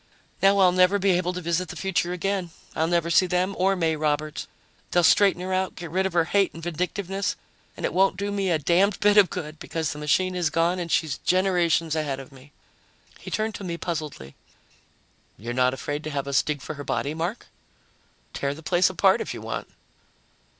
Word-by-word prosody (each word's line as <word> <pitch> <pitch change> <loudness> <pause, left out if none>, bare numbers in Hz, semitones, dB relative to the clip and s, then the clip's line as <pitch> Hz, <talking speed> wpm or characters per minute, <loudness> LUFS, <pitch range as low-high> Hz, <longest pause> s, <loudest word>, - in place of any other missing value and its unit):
Now 195 +1 +5
I'll 185 -2 +6
never 185 +2 +4
be 200 0 +2
able 180 0 +1
to 180 - -5
visit 170 +1 -1
the - - -7
future 185 -2 -1
again. 185 0 -2 0.3
I'll 160 - +1
never 170 0 +1
see 185 - +5
them 180 +2 0
or 195 +1 +2
May 165 -3 +1
Roberts. 150 0 -2 0.4
They'll 175 - +2
straighten 190 0 +4
her 185 0 -3
out, 185 0 -1
get 170 -2 -8
rid 190 +2 +1
of 190 - -8
her 170 -2 +3
hate 195 0 +1
and 165 - -9
vindictiveness, 180 +3 -2 0.4
and - - -3
it - - -2
won't 190 0 +3
do 200 +1 -2
me 200 -2 -1
a 170 - +3
damned 180 +6 +2
bit 205 0 +4
of 200 -3 +7
good 155 -4 -6
because 160 -2 -3
the 150 - -9
machine 185 +5 +1
is 175 -3 0
gone 170 +3 +1
and 170 -2 -4
she's 150 -5 0
generations 175 -4 +1
ahead 145 -4 -2
of 135 +1 -11
me." 135 +1 -16 0.7
He - - -9
turned 220 0 -1
to 200 - -7
me 170 -2 -4
puzzledly. 155 - -5 1.0
"You're 115 +5 -5
not 125 0 +3
afraid 145 +3 -4
to - - -3
have 140 -2 -3
us 140 -2 +3
dig 150 -2 -4
for - - -5
her 145 -1 -8
body, 145 +1 -2
Mark?" 170 +8 -4 0.9
"Tear 140 0 -2
the 160 - -12
place 175 +2 +3
apart - - +3
if - - -4
you - - -8
want." - - -5
175 Hz, 210 wpm, -25 LUFS, 155-185 Hz, 1.0 s, of